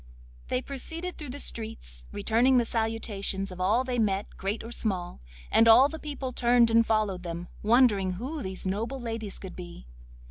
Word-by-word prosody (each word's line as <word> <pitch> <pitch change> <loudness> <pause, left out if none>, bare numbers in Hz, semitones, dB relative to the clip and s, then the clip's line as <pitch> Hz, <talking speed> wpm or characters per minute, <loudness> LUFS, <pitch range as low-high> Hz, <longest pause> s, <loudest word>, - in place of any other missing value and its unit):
They 255 - -1
proceeded 325 +6 -5
through 300 -4 -7
the 265 - -6
streets, - - -2
returning 235 +5 +3
the 240 - +3
salutations 220 -4 -1
of 185 0 -7
all 215 +7 +3
they 250 -2 -2
met, 200 -2 +1
great 200 +3 -3
or 230 - -8
small, 185 - -2 0.3
and 225 - +5
all 245 +5 +8
the 320 - -7
people 285 -3 -5
turned 240 -1 +3
and 230 0 +5
followed 215 -5 0
them, 170 0 -6
wondering 210 -5 +4
who 265 - -5
these 190 -3 -5
noble 225 +8 -2
ladies 225 -4 -5
could 190 - -9
be. 175 - -10
225 Hz, 175 wpm, -28 LUFS, 195-250 Hz, 0.3 s, all